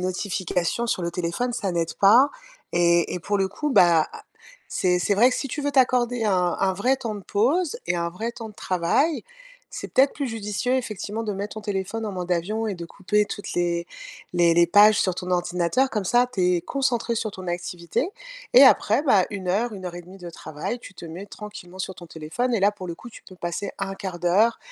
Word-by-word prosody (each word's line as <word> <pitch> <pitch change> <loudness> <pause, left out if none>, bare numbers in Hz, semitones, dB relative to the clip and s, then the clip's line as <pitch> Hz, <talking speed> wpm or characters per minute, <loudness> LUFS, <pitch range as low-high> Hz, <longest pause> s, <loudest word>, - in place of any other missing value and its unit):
notifications 185 +3 -1
sur 185 - -1
le 170 - -1
téléphone, 180 +8 -2
ça 210 -5 -2
n'aide 170 -1 -1
pas 235 +8 +6 0.4
et 170 -1 +3
et 180 - -2
pour 205 +4 -1
le 195 -1 +1
coup, 295 +10 -3
bah, 170 - +5
ah, - - -10 0.5
c'est 180 -1 +1
c'est 200 - +1
vrai 230 +5 +6
que - - -1
si 275 - -3
tu 295 - -4
veux 285 - 0
t'accorder 245 -3 +2
un 180 -4 +1
un 190 -1 +2
vrai 245 +8 +1
temps 235 -5 -4
de 205 - -8
pause 285 - +1
et 180 - 0
un 170 0 -1
vrai 220 +7 -4
temps 230 -3 -8
de 210 - -14
travail, 190 - 0 0.5
c'est - - -6
peut-être 270 +1 +3
plus 280 -3 -3
judicieux, 225 +3 -2
effectivement, 220 -2 -4
de 210 - -2
mettre 200 +2 -5
ton 215 - -6
téléphone 205 +2 -3
en 205 - -4
mode 180 -1 -5
d'avion 200 +6 -1
et 205 - -2
de 170 -1 -7
couper 210 +3 0
toutes 205 0 -6
les 170 0 0 0.5
les 170 -1 +4
les 170 0 +5
pages 210 +3 +6
sur 185 - +1
ton 180 0 -5
ordinateur 180 +8 +1
comme 210 -4 -2
ça 245 +5 +3
tu 195 - -2 0.2
es - - -1
concentré 245 -1 -1
sur 220 -1 -2
ton 185 -1 -9
activité 175 - -2 0.5
et - - +10
après, - - +4
bah, 205 - +4
1 190 -3 -5
heure, 220 +5 +1
1 190 -2 -8
heure 175 - -6
et 175 - -7
1/2 185 +3 -14
de 175 -1 -8
travail, 155 +9 -5
tu 200 - -12
te - - -10
mets 170 +5 -8
tranquillement 200 -3 -10
sur 190 0 -4
ton 175 -1 -11
téléphone 165 +11 -2
et 210 - +1
là, 205 +1 +4
pour 190 -3 -8
le 170 - -4
coup, 240 +7 -12
tu - - -13
peux 185 - -14
passer 175 +4 -4
1/4 195 -2 -5
d'heure 200 +7 +3
195 Hz, 225 wpm, -24 LUFS, 175-230 Hz, 0.5 s, et